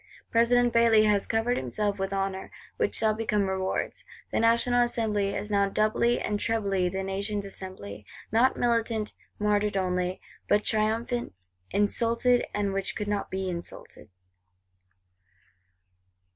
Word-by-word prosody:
President 240 Hz, +1 st, +3 dB
Bailly 230 Hz, -2 st, +5 dB
has 210 Hz, -2 st, +2 dB
covered 225 Hz, +2 st, +1 dB
himself 200 Hz, -, -2 dB
with 195 Hz, 0 st, -2 dB
honour; 195 Hz, -1 st, -2 dB, 0.3 s
which -, -, +1 dB
shall 220 Hz, -1 st, +3 dB
become 210 Hz, -2 st, 0 dB
rewards. 190 Hz, 0 st, -2 dB, 0.3 s
The -, -, 0 dB
National 235 Hz, +2 st, +3 dB
Assembly 215 Hz, -4 st, 0 dB
is 210 Hz, -, -4 dB
now 200 Hz, -1 st, +2 dB
doubly 215 Hz, +4 st, +2 dB
and 210 Hz, -1 st, -2 dB
trebly 200 Hz, -5 st, 0 dB
the 190 Hz, +1 st, -3 dB
Nation's 200 Hz, +2 st, -3 dB
Assembly; 145 Hz, -, -8 dB, 0.2 s
not 235 Hz, +5 st, +3 dB
militant, 230 Hz, -2 st, 0 dB, 0.2 s
martyred 210 Hz, -1 st, +1 dB
only, 180 Hz, -1 st, -1 dB, 0.3 s
but 210 Hz, 0 st, +3 dB
triumphant; 225 Hz, -, 0 dB, 0.3 s
insulted, 235 Hz, +4 st, +2 dB
and 200 Hz, -1 st, -1 dB
which 195 Hz, -1 st, -2 dB
could 210 Hz, -, -3 dB
not 205 Hz, -1 st, -2 dB
be 190 Hz, 0 st, -3 dB
insulted. 170 Hz, -10 st, -7 dB
210 Hz, 130 wpm, -27 LUFS, 195-230 Hz, 0.3 s, Bailly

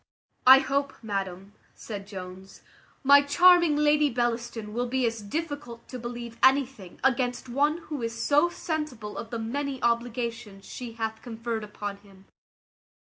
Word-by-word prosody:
"I 260 Hz, +1 st, +11 dB
hope, 275 Hz, +1 st, 0 dB
madam," 195 Hz, -2 st, -4 dB, 0.2 s
said 200 Hz, -3 st, -7 dB
Jones, 190 Hz, -1 st, -10 dB, 0.4 s
"my 280 Hz, +1 st, +8 dB
charming 345 Hz, +2 st, +5 dB
Lady 300 Hz, 0 st, +3 dB
Bellaston 235 Hz, -3 st, -2 dB
will 245 Hz, +2 st, -1 dB
be 255 Hz, +1 st, 0 dB
as 230 Hz, -1 st, -2 dB
difficult 285 Hz, 0 st, -5 dB
to 255 Hz, -, -6 dB
believe 235 Hz, -1 st, -7 dB
anything 260 Hz, -8 st, +2 dB
against 250 Hz, -1 st, +1 dB
one 290 Hz, +6 st, +1 dB
who 300 Hz, -5 st, -6 dB
is 230 Hz, 0 st, -4 dB
so 295 Hz, +7 st, +3 dB
sensible 300 Hz, -11 st, -4 dB
of 230 Hz, -, -6 dB
the 235 Hz, -, -4 dB
many 265 Hz, +4 st, -3 dB
obligations 235 Hz, -3 st, -2 dB
she 245 Hz, -2 st, -7 dB
hath 220 Hz, -1 st, -4 dB
conferred 230 Hz, -1 st, -4 dB
upon 205 Hz, -1 st, -6 dB
him." 195 Hz, -1 st, -19 dB
240 Hz, 145 wpm, -27 LUFS, 220-280 Hz, 0.4 s, I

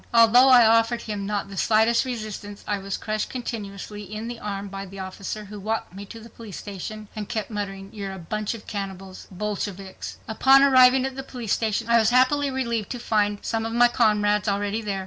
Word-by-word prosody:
Although 235 Hz, +3 st, +7 dB
I 245 Hz, -3 st, +8 dB
offered 230 Hz, +1 st, +3 dB
not 205 Hz, -1 st, -3 dB
the 195 Hz, -, -9 dB
slightest 225 Hz, +4 st, +3 dB
resistance, 215 Hz, -4 st, -6 dB
I 205 Hz, -1 st, -1 dB
was 195 Hz, 0 st, -4 dB
crushed 215 Hz, 0 st, -3 dB
continuously 210 Hz, -4 st, -6 dB
in 215 Hz, +3 st, -6 dB
the 240 Hz, -1 st, -6 dB
arm 200 Hz, -1 st, -4 dB
by 195 Hz, 0 st, -7 dB
the 195 Hz, +1 st, -11 dB
officer 195 Hz, +2 st, -6 dB
who 205 Hz, +1 st, -9 dB
walked 215 Hz, -2 st, -3 dB
me 200 Hz, +2 st, -8 dB
to 230 Hz, -, -10 dB
the 225 Hz, -, -12 dB
police 220 Hz, -4 st, -10 dB
station, 210 Hz, +2 st, -7 dB
and 210 Hz, -2 st, -5 dB
kept 220 Hz, -1 st, -3 dB
muttering: 195 Hz, -2 st, -5 dB
"You're 200 Hz, -2 st, -5 dB
a -, -, -7 dB
bunch 210 Hz, +5 st, -3 dB
of 220 Hz, -, -12 dB
cannibals,—cannibals,—Bolsheviks." 195 Hz, 0 st, -6 dB
Upon 265 Hz, +5 st, +5 dB
arriving 260 Hz, -1 st, +6 dB
at 265 Hz, -1 st, -4 dB
the 270 Hz, -, -4 dB
police 245 Hz, -5 st, -4 dB
station 220 Hz, 0 st, -1 dB
I 235 Hz, 0 st, +5 dB
was 220 Hz, -1 st, +3 dB
happily 260 Hz, +3 st, +3 dB
relieved 235 Hz, -5 st, -2 dB
to -, -, -5 dB
find 210 Hz, -3 st, +1 dB
eve 205 Hz, -, -6 dB
of 225 Hz, 0 st, -3 dB
my 240 Hz, +1 st, +5 dB
comrades 210 Hz, -3 st, +2 dB
already 205 Hz, +2 st, -1 dB
there. 200 Hz, -3 st, -3 dB
215 Hz, 200 wpm, -24 LUFS, 200-235 Hz, -, I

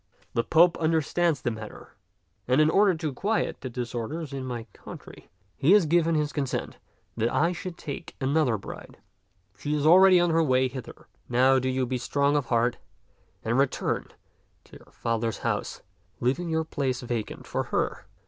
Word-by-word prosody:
The 115 Hz, -, +1 dB
Pope 170 Hz, +5 st, +4 dB
understands 160 Hz, -1 st, +1 dB
the 120 Hz, -, 0 dB
matter, 110 Hz, -1 st, -10 dB, 0.5 s
and 130 Hz, +3 st, +3 dB
in 155 Hz, +1 st, +4 dB
order 195 Hz, -1 st, +4 dB
to 155 Hz, -3 st, -3 dB
quiet 210 Hz, +10 st, -1 dB
the 130 Hz, -, -5 dB
disorders 125 Hz, +5 st, -5 dB
in 135 Hz, -1 st, -4 dB
my 120 Hz, -2 st, -4 dB
country, -, -, -12 dB, 0.3 s
he 155 Hz, +8 st, +4 dB
has 205 Hz, -5 st, +6 dB
given 165 Hz, +1 st, +2 dB
his 150 Hz, -1 st, 0 dB
consent 140 Hz, -3 st, -3 dB, 0.4 s
that 115 Hz, +1 st, 0 dB
I 170 Hz, +3 st, +2 dB
should 180 Hz, 0 st, -6 dB
take 145 Hz, -, -7 dB
another 135 Hz, -3 st, +1 dB
bride. 100 Hz, -, -10 dB, 0.6 s
She 145 Hz, +8 st, -2 dB
is 150 Hz, 0 st, -1 dB
already 185 Hz, +2 st, +7 dB
on 175 Hz, -1 st, +2 dB
her 165 Hz, +1 st, +3 dB
way 130 Hz, -4 st, +2 dB
hither. 130 Hz, 0 st, -9 dB, 0.2 s
Now 130 Hz, +2 st, +4 dB
do 130 Hz, 0 st, -1 dB
you 130 Hz, 0 st, 0 dB
be 125 Hz, 0 st, -2 dB
strong 140 Hz, +3 st, +1 dB
of 145 Hz, -4 st, 0 dB
heart 120 Hz, 0 st, +1 dB, 0.7 s
and 115 Hz, +4 st, +1 dB
return 140 Hz, -1 st, 0 dB, 0.6 s
to -, -, -15 dB
your -, -, -21 dB
father's 115 Hz, -1 st, -2 dB
house, -, -, -3 dB, 0.4 s
leaving 140 Hz, +8 st, 0 dB
your 160 Hz, 0 st, 0 dB
place 135 Hz, -5 st, -2 dB
vacant 120 Hz, -3 st, -4 dB
for -, -, -2 dB
her. -, -, -2 dB
140 Hz, 170 wpm, -26 LUFS, 125-160 Hz, 0.7 s, already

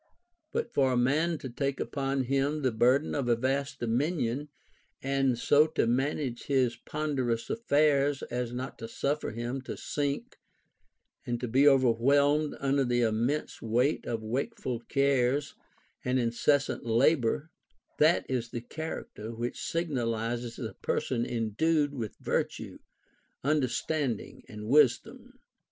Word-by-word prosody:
But 465 Hz, -, -2 dB
for 135 Hz, -2 st, +3 dB
a 125 Hz, -, +1 dB
man 155 Hz, +7 st, +2 dB
to 135 Hz, -, -7 dB
take 135 Hz, +2 st, -2 dB
upon 135 Hz, -1 st, -1 dB
him 140 Hz, +3 st, 0 dB
the 130 Hz, -, +2 dB
burden 125 Hz, +6 st, +3 dB
of 135 Hz, -4 st, -1 dB
a 120 Hz, -, +5 dB
vast 135 Hz, +4 st, -1 dB
dominion, 135 Hz, +2 st, -1 dB, 0.5 s
and 135 Hz, -2 st, +1 dB
so 145 Hz, +5 st, +4 dB
to -, -, +4 dB
manage 130 Hz, +1 st, -1 dB
his 130 Hz, -4 st, +2 dB
ponderous 130 Hz, -4 st, -2 dB
affairs 145 Hz, -, +2 dB
as 125 Hz, -1 st, -3 dB
not 130 Hz, +2 st, -5 dB
to 115 Hz, -, -6 dB
suffer 140 Hz, +6 st, -2 dB
himself 120 Hz, +4 st, -4 dB
to -, -, -5 dB
sink 145 Hz, -, -3 dB, 0.9 s
and 120 Hz, -2 st, -3 dB
be 135 Hz, +4 st, +5 dB
overwhelmed 140 Hz, +3 st, +4 dB
under 140 Hz, 0 st, +2 dB
the 120 Hz, -1 st, +1 dB
immense 115 Hz, +6 st, 0 dB
weight 120 Hz, +6 st, +1 dB
of 115 Hz, -2 st, -2 dB
wakeful 120 Hz, +1 st, -3 dB
cares 140 Hz, +2 st, +1 dB, 0.5 s
and 125 Hz, +1 st, +1 dB
incessant 125 Hz, +4 st, +1 dB
labor, 130 Hz, +5 st, +2 dB, 0.5 s
that 155 Hz, +3 st, +4 dB
is 120 Hz, -3 st, -2 dB
the 120 Hz, -1 st, -5 dB
character 120 Hz, -5 st, -6 dB
which 120 Hz, +2 st, -4 dB
signalizes 120 Hz, -7 st, -2 dB
a 110 Hz, -5 st, -5 dB
person 120 Hz, +3 st, -1 dB
endued 145 Hz, +7 st, +1 dB
with 115 Hz, -6 st, -5 dB
virtue, -, -, -2 dB, 0.6 s
understanding, 140 Hz, -2 st, -1 dB
and 105 Hz, 0 st, -8 dB
wisdom. 130 Hz, -2 st, +2 dB
130 Hz, 130 wpm, -29 LUFS, 120-145 Hz, 0.9 s, a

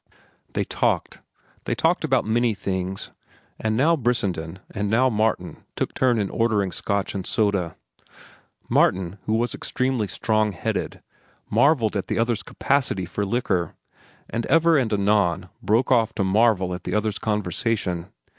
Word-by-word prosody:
They -, -, 0 dB
talked. -, -, -1 dB, 0.4 s
They -, -, -1 dB
talked -, -, +1 dB
about -, -, +2 dB
many 115 Hz, 0 st, +1 dB
things, 95 Hz, -1 st, -3 dB, 0.5 s
and 110 Hz, 0 st, 0 dB
now 160 Hz, +6 st, +4 dB
Brissenden 95 Hz, -, -1 dB
and 105 Hz, -1 st, -2 dB
now 125 Hz, +4 st, +3 dB
Martin 105 Hz, -4 st, -1 dB
took -, -, -2 dB
turn 125 Hz, -2 st, +2 dB
in 100 Hz, -3 st, -1 dB
ordering 105 Hz, -5 st, +1 dB
Scotch 100 Hz, +1 st, -2 dB
and 95 Hz, -, -3 dB
soda. 100 Hz, -5 st, 0 dB, 0.9 s
Martin, 95 Hz, +1 st, +2 dB
who 110 Hz, -, +2 dB
was 120 Hz, +2 st, 0 dB
extremely 130 Hz, -4 st, -1 dB
strong 110 Hz, -1 st, 0 dB
headed, 90 Hz, -, -3 dB, 0.5 s
marvelled 120 Hz, -1 st, +3 dB
at 100 Hz, -, -2 dB
the -, -, -1 dB
other's 115 Hz, -2 st, +1 dB
capacity 130 Hz, -2 st, 0 dB
for 100 Hz, +3 st, -3 dB
liquor, 100 Hz, -6 st, -1 dB, 0.5 s
and 115 Hz, 0 st, -3 dB
ever 165 Hz, 0 st, +4 dB
and 125 Hz, -6 st, +2 dB
anon 100 Hz, -3 st, +1 dB
broke 115 Hz, +5 st, +2 dB
off 115 Hz, -3 st, +3 dB
to 100 Hz, -, 0 dB
marvel 95 Hz, -2 st, +3 dB
at 90 Hz, 0 st, -6 dB
the 90 Hz, -, -2 dB
other's 105 Hz, -1 st, 0 dB
conversation. 100 Hz, -3 st, -1 dB
105 Hz, 145 wpm, -24 LUFS, 95-115 Hz, 0.9 s, now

